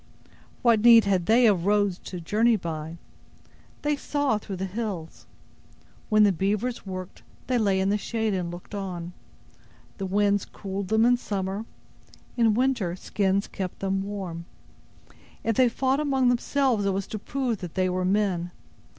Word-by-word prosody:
What 230 -3 +4
need 230 -1 +8
had 185 -3 +1
they 235 +3 +5
of 195 -5 +3
roads 205 -3 +2
to 180 - -6
journey 220 +7 +2
by! 165 -3 -5 0.9
They 295 0 +1
saw 285 -5 0
through 200 -2 -6
the 190 +1 -3
hills! 190 -5 -5 0.8
When 215 -1 +5
the 205 - +5
beavers 205 +6 -2
worked, 185 -1 -7 0.2
they 250 -1 +1
lay 200 -3 +2
in 190 +1 +1
the 210 +1 +1
shade, 220 -1 -1
and 180 -2 -2
looked 175 +4 -10
on. 180 -3 -5 0.9
The 195 - -2
winds 205 +1 +2
cooled 195 -1 -6
them 220 +3 +3
in 245 0 +4
summer; 200 -1 -3 0.7
in 225 -3 +3
winter, 240 -8 +1
skins 195 +1 0
kept 185 -2 -5
them 195 0 -1
warm. 190 -4 -5 1.0
If 225 - 0
they 255 +1 +5
fought 265 +3 0
among 270 -4 +2
themselves, 245 -2 +1
it 195 - +1
was 195 0 -2
to 215 - -6
prove 245 -1 -2
that 175 -4 -8
they 185 0 +2
were 185 0 -1
men. 185 -2 +1
200 Hz, 160 wpm, -26 LUFS, 185-230 Hz, 1.0 s, need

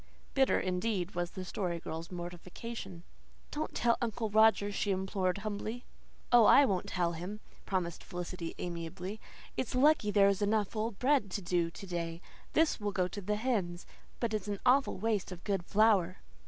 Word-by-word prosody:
Bitter 270 -1 +3
indeed 185 0 -1
was 175 0 -1
the 185 - -7
poor - - -6
Story 175 -2 -2
Girl's 165 +1 -6
mortification. 180 +2 -7 0.5
"Don't 305 +1 -3
tell 235 -1 +2
Uncle 225 -2 -2
Roger," 220 -1 +5
she 205 - -1
implored 190 -1 0
humbly. 215 +3 -4 0.5
"Oh, 240 -2 +8
I 280 +5 +8
won't 190 -7 -1
tell 175 -2 0
him," 180 +5 -6 0.3
promised 175 -3 -2
Felicity 175 -1 -5
amiably. 175 +4 -5 0.4
"It's 255 - -2
lucky 280 -4 +4
there's 200 -1 +4
enough 210 +1 +1
old 220 -1 -2
bread 260 -4 +2
to 200 - -3
do 175 -1 +1
to 180 - -10
day. 170 -2 -3 0.3
This 320 -4 +3
will 205 -1 -1
go 185 -2 +1
to 205 - -6
the 210 +2 -1
hens. 205 -7 -1 0.3
But 230 -2 -1
it's 210 -2 -2
an 205 -1 -2
awful 265 +2 +4
waste 210 -2 -1
of 180 -1 -8
good 195 -4 -1
flour." 200 -3 +3
200 Hz, 170 wpm, -32 LUFS, 180-220 Hz, 0.5 s, Oh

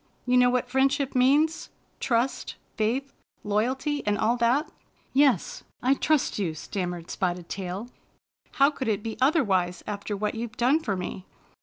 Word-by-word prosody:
You 250 0 +2
know 250 0 +6
what 250 0 0
friendship 270 +2 +1
means? 290 +5 +3 0.2
— - - -40
^trust, 240 +1 0 0.2
faith, 245 +6 -1 0.3
loyalty, 260 +8 0
and 205 0 +2
all 230 +4 +2
that?" 245 +6 +2 0.5
"Yes, 270 -8 +2 0.2
I 260 +2 +4
trust 295 -4 +1
you," 170 -6 -1
stammered 175 0 -4
Spotted 180 -2 -2
Tail. 190 +3 -4 0.7
"How 280 0 +4
could 265 -4 -5
it 210 -2 0
be 225 -1 -4
otherwise 200 - +2
after 205 0 -4
what 210 +1 -1
you've 230 0 -6
done 260 +6 +3
for 220 -11 -2
me? 185 +1 -6
235 Hz, 155 wpm, -26 LUFS, 200-270 Hz, 0.7 s, know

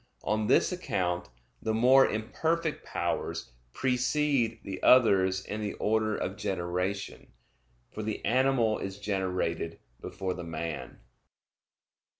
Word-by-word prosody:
On 110 0 0
this - - +4
account, 90 - -2 0.3
the 110 0 -1
more 130 +4 +6
imperfect 160 +9 -1
powers - - -3 0.2
precede 125 - +1
the 95 -1 -6
others 95 -6 +5
in 105 +1 -4
the 105 -1 -2
order 110 0 +1
of 95 - -3
generation, 95 0 -3 0.6
for 110 - -6
the 110 0 -4
animal 125 -3 +2
is 95 0 -5
generated 95 -5 -2 0.2
before 95 -1 -3
the 90 - -7
man. 80 -1 -5
105 Hz, 115 wpm, -29 LUFS, 95-125 Hz, 0.6 s, more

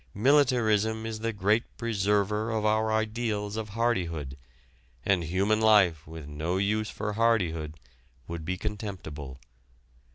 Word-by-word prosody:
Militarism 110 -3 +3
is 110 -1 -4
the 115 +1 -1
great 105 +2 0
preserver 105 -1 0
of 110 -2 -1
our 110 +1 +2
ideals 110 -1 -1
of 110 -1 -4
hardihood, 85 - -1 0.7
and 95 -3 +2
human 100 +6 +1
life 100 -9 +4
with 80 -1 -8
no 80 +5 -2
use 105 +2 0
for 105 0 -4
hardihood 90 -9 +1 0.5
would 85 -1 -5
be 90 +3 -2
contemptible. 90 - -6
105 Hz, 125 wpm, -28 LUFS, 90-110 Hz, 0.7 s, life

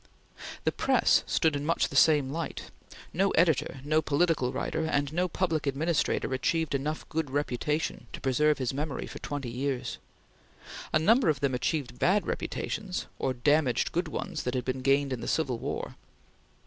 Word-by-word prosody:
The - - +2
press - - +3
stood 160 -2 +2
in 145 - -2
much 165 +3 +1
the - - -8
same 145 -4 +5
light. 165 +2 -5 0.4
No 195 +3 +2
editor, 160 -5 +2
no 155 +2 +2
political 150 -4 +1
writer, 160 +4 -2
and 145 -2 0
no 180 +2 +1
public 165 -4 -1
administrator 150 -1 0
achieved 160 +4 0
enough 150 +3 -2
good 160 -2 -2
reputation 145 +2 -2
to - - -7
preserve 150 +3 +2
his 130 -1 -2
memory 145 +1 -3
for - - -9
twenty 140 -5 -4
years. 130 0 -3 0.9
A - - +4
number 220 - +4
of 150 -4 +1
them 140 -1 0
achieved 125 0 -2
bad 195 +3 +3
reputations, 195 -4 -3
or 130 -1 0
damaged 140 +1 +2
good 175 +1 -1
ones - - -4
that 125 +1 -2
had 125 - -1
been 130 0 -2
gained 135 +1 +2
in 120 - -4
the - - -5
Civil 130 -7 0
War. - - -4
145 Hz, 170 wpm, -29 LUFS, 130-160 Hz, 0.9 s, same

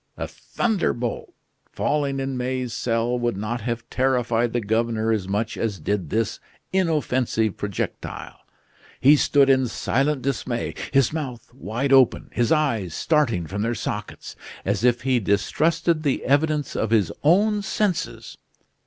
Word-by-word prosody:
A - - -3
thunderbolt 175 - -2 0.4
falling 140 -2 0
in 135 0 -2
May's 125 -1 -2
cell 120 +1 0
would 120 -4 -1
not 110 +4 -3
have 115 +1 -4
terrified 120 -3 +1
the 120 - 0
governor 115 0 0
as 105 -4 -1
much 105 +3 -2
as 105 -5 -2
did 95 -1 -2
this 110 +3 -1 0.3
inoffensive 130 - +1
projectile. 100 -2 -5 0.6
He 140 +4 +7
stood 140 -1 +4
in 130 -1 +4
silent 135 +4 0
dismay; 130 -3 -2 0.2
his 135 0 +3
mouth 130 -7 -5
wide 115 - -1
open, 130 -3 +4
his 120 -1 +1
eyes 115 - +1
starting 130 - +1
from 100 +6 -4
their 115 +2 0
sockets, 105 -1 -5 0.3
as 100 +2 0
if 120 -1 +3
he 130 -2 +2
distrusted 155 - +1
the 145 -4 -1
evidence 150 +1 +1
of 110 - 0
his 110 -6 +2
own 205 +7 +3
senses. 200 -2 -2
120 Hz, 140 wpm, -23 LUFS, 110-140 Hz, 0.6 s, He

